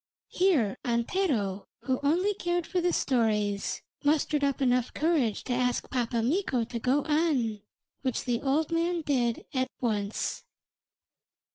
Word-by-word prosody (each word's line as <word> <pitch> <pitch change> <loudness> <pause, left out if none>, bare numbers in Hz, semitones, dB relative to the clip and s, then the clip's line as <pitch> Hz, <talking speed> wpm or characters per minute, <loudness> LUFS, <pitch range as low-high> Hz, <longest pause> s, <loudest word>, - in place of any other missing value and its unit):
Here 315 - +2
Antero, 235 - 0
who 255 +2 -1
only 350 +8 +2
cared 350 -3 -1
for 360 - -1
the 355 +1 +2
stories, 210 -8 0 0.2
mustered 295 0 +2
up 280 -1 +1
enough 250 -2 +2
courage 295 -9 +1
to 250 - -2
ask 245 0 0
Pappa 235 -2 0
Mikko 265 - +1
to 230 +1 -5
go 260 +5 +2
on, 290 -9 +1 0.4
which 260 -3 -1
the 240 -2 0
old 295 +4 +1
man 335 +1 +1
did 245 -6 0
at 260 -1 0
once. 210 -4 -2
260 Hz, 135 wpm, -28 LUFS, 235-320 Hz, 0.4 s, Here